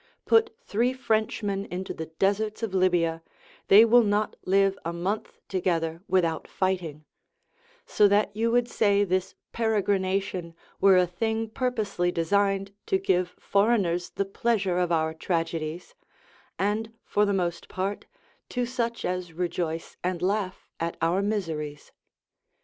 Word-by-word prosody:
Put 450 0 +3
three 240 +5 +1
Frenchmen 215 -5 -1
into 185 +2 -5
the 160 - -6
deserts 205 +6 -1
of 215 -4 -2
Libya, 175 -3 +2 0.5
they 210 +3 +8
will 240 +2 +6
not 210 -1 0
live 195 +1 +3
a 170 - -2
month 185 +5 -3
together 170 -3 -1
without 170 -4 +1
fighting; 175 -6 -2 0.8
so 210 - +4
that 205 0 +2
you 225 +2 +1
would 240 +1 +2
say 205 -3 +2
this 185 -1 -1 0.2
peregrination 195 -5 0 0.2
were 195 -1 +6
a 180 - +5
thing 220 +5 -2
purposely 215 -8 -1
designed 195 +3 +1
to 385 - +3
give 180 - 0
foreigners 200 -5 +1
the 200 - -2
pleasure 195 -3 0
of 175 -1 0
our 160 -1 +1
tragedies, 165 0 -3 0.6
and, 215 +3 -1
for 210 - +2
the 205 - +2
most 175 -3 -2
part, 195 +1 -3 0.4
to 245 -1 -1
such 235 -1 -2
as 180 -2 -3
rejoice 170 -1 -3
and 180 -1 -2
laugh 195 0 -1
at 165 0 -3
our 170 +4 +2
miseries. 160 -8 -3
195 Hz, 135 wpm, -27 LUFS, 175-215 Hz, 0.8 s, they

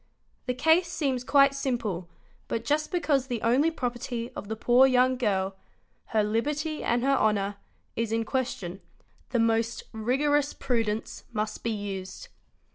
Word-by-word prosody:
The 250 - 0
case 320 +6 +4
seems 275 -7 -1
quite 275 +1 +5
simple 235 -10 -2 0.4
but 230 0 -3
just 300 +1 0
because 290 -7 +1
the 240 -3 -2
only 260 +8 +4
property 240 -4 -4
of 205 - -6
the 220 - -3
poor 245 +4 +5
young 255 0 +4
girl—her 200 0 -2
liberty 295 +9 -1
and 240 +1 +1
her 275 +1 +3
honour—is 210 +1 -2
in 225 0 0
question, 205 -8 -3 0.5
the 245 - 0
most 230 0 +1
rigorous 280 +6 +1
prudence 225 -4 -2
must 215 0 -3
be 230 - 0
used. 195 -3 -5
240 Hz, 135 wpm, -27 LUFS, 215-275 Hz, 0.5 s, quite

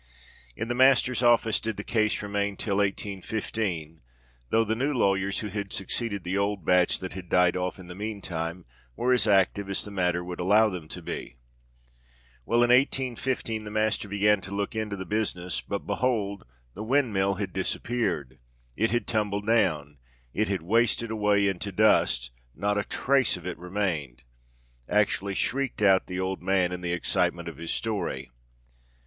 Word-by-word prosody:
In 110 - -4
the 120 - -1
Master's 130 -1 +4
office 120 -2 +4
did 110 -2 -4
the 100 - -4
case 110 -2 0
remain 100 -1 -2
till 100 -3 -1
1815—though 85 - -2
the 110 0 -1
new 135 +5 0
lawyers 95 -3 +1
who 105 - -4
had 100 -1 -4
succeeded 100 +1 -2
the 90 +2 -2
old 100 -4 -1
batch 90 0 +4
that 95 - -6
had 90 -2 -8
died 90 -1 +4
off 90 0 -2
in 95 - -11
the 90 - -8
meantime, 90 -4 -4 0.3
were 125 +1 +2
as 115 -4 +3
active 100 0 +3
as 100 - -1
the 105 - -8
matter 90 -2 0
would 90 0 -7
allow 105 +5 +4
them 90 -5 -6
to - - -7
be. 60 - -6 1.1
Well—in 120 +1 +3
1815 125 -3 +1
the 105 - -7
Master 110 0 0
began 100 0 +2
to 100 +2 -6
look 100 +1 -2
into 110 -2 -2
the 95 -1 -6
business; 90 -5 -2
but, - - -5
behold! 105 -6 -1 0.3
the 100 - -8
windmill 110 -6 +1
had 95 -2 -4
disappeared—it 65 - -2
had 120 0 0
tumbled 105 -3 -1
down—it 75 - -1
had 95 -4 -2
wasted 115 +3 +2
away 105 -2 +2
into 95 +1 -2
dust—not 60 - +1
a 105 - +1
trace 135 -5 +1
of 90 - -12
it 90 - -5
remained!" 85 -9 -3 0.7
actually 100 -1 +1
shrieked 135 -2 -1
out 95 -2 +5
the 90 0 -4
old 95 0 -2
man, 95 -2 +2
in 90 0 -5
the 90 -1 -2
excitement 85 0 0
of 85 - -7
his 85 0 -6
story. 100 - -2
100 Hz, 160 wpm, -27 LUFS, 90-110 Hz, 1.1 s, out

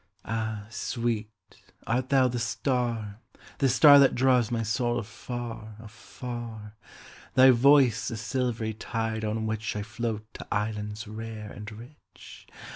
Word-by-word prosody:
Ah, 110 -2 -3
sweet, 115 -2 -2 0.6
art 125 +3 -1
thou 135 -2 +4
the 120 -1 -2
star, 115 -4 -2 0.4
the 135 - +3
starThat 140 +1 +7
draws 125 -3 +3
my 115 -2 -1
soul 120 +2 0
afar, 115 -1 -6
afar? 115 0 -8 0.6
Thy 130 0 +8
voice 130 -2 +5
the 115 - -3
silvery 115 -1 -2
tide 110 0 -3
on 110 +1 -1
whichI 110 -1 -3
float 110 -1 -4
to - - -9
islands 105 +1 -3
rare 110 -1 -7
and 105 +2 -8
rich? 120 +7 -14
115 Hz, 120 wpm, -27 LUFS, 110-125 Hz, 0.6 s, Thy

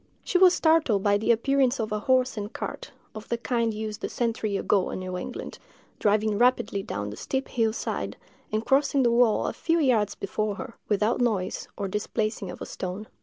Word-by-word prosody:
She 360 - +1
was 370 -1 +7
startled 315 - +3
by 205 0 +3
the 220 - +2
appearance 265 +2 +2
of 215 -1 -2
a 210 - 0
horse 255 +3 +2
and 210 0 -5
cart, - - -6 0.2
of 215 0 -9
the 235 - 0
kind 230 0 0
used 215 0 -5
a - - -1
century 225 -4 -1
ago 195 -1 +1
in - - -4
New 185 0 -5
England, 215 +7 -6 0.4
driving 210 0 +2
rapidly 245 -5 +2
down 105 - -4
the - - -7
steep 265 - -3
hill 225 -2 +1
side, 220 - -4 0.3
and 215 +1 -1
crossing 275 0 +3
the 240 - +3
wall 235 -2 +3
a - - -1
few 330 0 0
yards 230 -8 +2
before 210 +1 -2
her, 235 +3 -7 0.2
without 215 +4 +1
noise 205 -6 -1
or 200 - -2
displacing 210 0 -2
of - - -7
a - - -5
stone. 190 +4 -6
220 Hz, 200 wpm, -26 LUFS, 205-250 Hz, 0.4 s, was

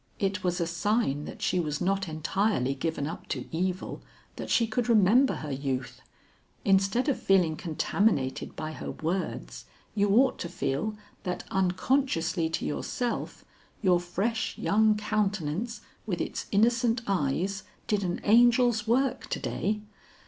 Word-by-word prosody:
It 195 -1 -1
was 180 0 0
a 170 - +1
sign 170 - 0
that - - -8
she 180 - +2
was 150 -3 -1
not 195 +1 0
entirely 155 - 0
given 145 +1 -2
up 160 - -6
to - - -3
evil, 185 +2 -2 0.3
that - - -6
she 230 - +4
could 225 +2 -1
remember 230 +5 +5
her 150 -2 -5
youth. 135 -2 -3 0.6
Instead 195 +7 +3
of 280 - 0
feeling 180 -5 +3
contaminated 155 -3 0
by 155 - -4
her - - -6
words, 175 +4 -3 0.3
you 205 -1 +2
ought 260 +2 +4
to 170 - -4
feel, 160 +5 -2 0.3
that 180 -2 -3
unconsciously 185 -3 +1
to 165 - -2
yourself, 240 +10 -3 0.4
your 180 -2 +4
fresh 195 +6 -2
young 215 +1 +3
countenance 210 0 -1 0.3
with - - -1
its - - -3
innocent 230 +2 +3
eyes 190 +2 0 0.2
did 210 -2 0
an 175 -1 -1
angel's 235 0 +5
work 260 +3 +1
to - - -2
day. 210 0 -2
195 Hz, 140 wpm, -28 LUFS, 165-220 Hz, 0.6 s, remember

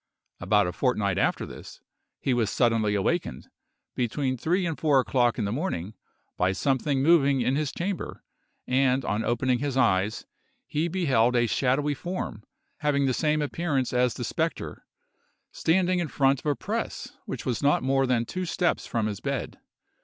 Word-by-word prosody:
About 105 -2 +3
a 90 - -2
fortnight 100 -3 0
after - - +1
this, - - -11 0.4
he 130 - 0
was 115 -4 +1
suddenly 115 -4 +2
awakened, 100 - -1 0.4
between 130 +2 -1
three 175 +9 0
and 165 -2 -1
four 145 -4 +3
o'clock 125 -2 +2
in 110 - -1
the 100 - -2
morning, 110 - -3 0.4
by 95 +1 +2
something 135 +4 0
moving 140 -4 +4
in 130 +2 +1
his 150 -1 -1
chamber, 185 +2 -4 0.4
and 130 0 +2
on 105 +2 -1
opening 120 +2 +1
his 140 -2 -2
eyes, 100 -4 +2 0.4
he 155 +3 -1
beheld 130 -10 +2
a 120 -1 +4
shadowy 135 +5 +1
form, 175 - -5 0.4
having 145 -2 +1
the 130 - +1
same 150 +2 +1
appearance 145 -4 -1
as 125 -1 +2
the - - -4
spectre, - - -3 0.6
standing 180 +2 +2
in 170 - -1
front 135 -2 +2
of - - -7
a 145 - +2
press - - -4
which - - -5
was 125 - -1
not 145 -2 +3
more 135 0 +2
than 120 -2 +1
two 185 +8 -4
steps 175 +1 0
from 115 -2 -1
his 105 -2 -3
bed. - - -4
130 Hz, 170 wpm, -26 LUFS, 115-150 Hz, 0.6 s, moving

